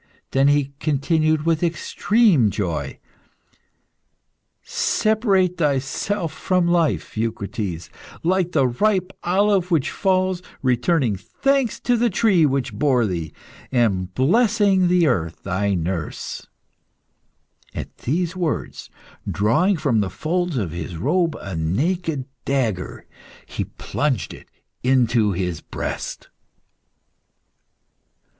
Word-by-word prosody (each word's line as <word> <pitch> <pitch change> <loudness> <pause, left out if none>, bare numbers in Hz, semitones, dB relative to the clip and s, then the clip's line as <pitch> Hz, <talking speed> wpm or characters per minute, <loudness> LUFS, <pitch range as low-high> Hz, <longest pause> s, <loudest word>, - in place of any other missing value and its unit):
Then 135 +1 +3
he 145 -1 +2
continued, 155 +1 +1
with 165 -1 +2
extreme 175 - +2
joy 80 -9 -3 1.7
"Separate 200 -5 +1
thyself 155 +5 -1
from 180 +1 +1
life, 170 -3 +1
Eucrites, 105 -5 -3 0.3
like 180 0 +1
the 135 - +3
ripe 190 - 0
olive 190 0 +2
which 160 -7 +1
falls; 185 -2 +1 0.2
returning 125 - +2
thanks 275 - 0
to 245 - +2
the 235 +1 +2
tree 190 -6 +3
which 135 -2 -1
bore 130 -5 +2
thee, 85 -6 -3 0.4
and 100 -8 +1
blessing 200 - +3
the 175 -1 +4
earth, 85 - -1
thy 100 +1 0
nurse." 85 -2 -4 1.3
At - - -6
these 170 +6 -1
words, 175 -4 -3 0.4
drawing 145 - +2
from 135 -7 +1
the 100 -2 0
folds 175 - -2
of 95 -9 -2
his 85 0 -6
robe 165 - +1
a 95 -4 -6
naked 140 - -1 0.2
dagger, 115 -10 -2 0.4
he - - -4
plunged 130 - -2
it - - -14 0.3
into 120 -5 +3
his 90 -3 -3
breast. - - -5
145 Hz, 105 wpm, -22 LUFS, -, 1.7 s, the